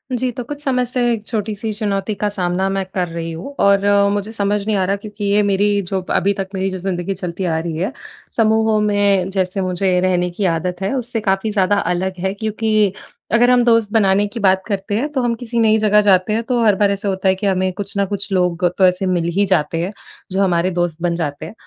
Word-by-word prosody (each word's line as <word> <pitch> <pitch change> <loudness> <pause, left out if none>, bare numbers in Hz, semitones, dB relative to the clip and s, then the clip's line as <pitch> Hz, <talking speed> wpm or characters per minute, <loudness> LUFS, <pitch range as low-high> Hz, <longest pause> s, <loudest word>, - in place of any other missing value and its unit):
जी, 255 +1 -1
तो 245 +1 -6
कुछ 290 +4 -7
समय 255 -3 +1
से 250 +1 -2
1 215 -2 -5
छोटी-सी 215 -1 -2
चुनौती 205 -1 -2
का 210 - -1
सामना 185 -1 -1
मैं 195 0 -1
कर 180 -2 0
रही 165 0 -5
हूँ। 170 +13 -7
और 200 0 +4
अ, 200 0 +4
मुझे 205 +1 -2
समझ 205 -2 -1
नहीं 215 - +1
आ 190 - +1
रहा 195 +2 +1
क्योंकि 205 +1 -7
ये 200 +1 +3
मेरी 205 0 +2
जो 190 -1 -1
अभी 200 +1 +2
तक 195 -1 -4
मेरी 190 0 -1
जो 185 - -5
ज़िंदगी 185 0 -3
चलती 180 0 -5
आ 165 -2 0
रही 165 -1 -4
है 190 +8 -1 0.5
समूहों 220 -1 +3
में 200 -3 +2
जैसे 190 0 -1
मुझे 185 0 +1
रहने 180 -1 +1
की 195 +3 -2
आदत 180 +1 -1
है, 195 +5 -1
उससे 245 -3 -2
काफ़ी 195 +1 0
ज़्यादा 205 0 +2 0.2
अलग 185 +2 -2
है। 190 +1 -1
क्योंकि, 215 -1 0 0.4
अगर 240 +2 +4
हम 250 -1 +4
दोस्त 230 -3 +3
बनाने 205 -2 +3
की 230 - -7
बात 190 -2 +3
करते 200 0 -2
हैं। 290 +6 -1
तो 270 - -1
हम 240 -1 0
किसी 235 0 -3
नई 220 -1 +4
जगह 210 -1 +4
जाते 195 0 +3
हैं 225 +2 0
तो 240 0 0
हर 210 -2 +5
बार 200 0 +2
ऐसा 200 +1 -2
होता 190 0 -1
है 190 - +3
कि 200 +2 -2
हमें 185 -1 +1
कुछ 200 +2 -3
न 200 - +2
कुछ 200 +1 -3
लोग 180 -1 +1
तो 190 - +5
ऐसे 180 +1 0
मिल 175 -2 0
ही 205 - +4
जाते 165 -3 0
हैं। 180 +3 -2 0.4
जो 190 +1 0
हमारे 180 -1 +1
दोस्त 170 -2 -1
बन 175 -1 0
जाते 155 -3 -4
हैं। 170 - -9
200 Hz, 240 wpm, -18 LUFS, 185-215 Hz, 0.5 s, हर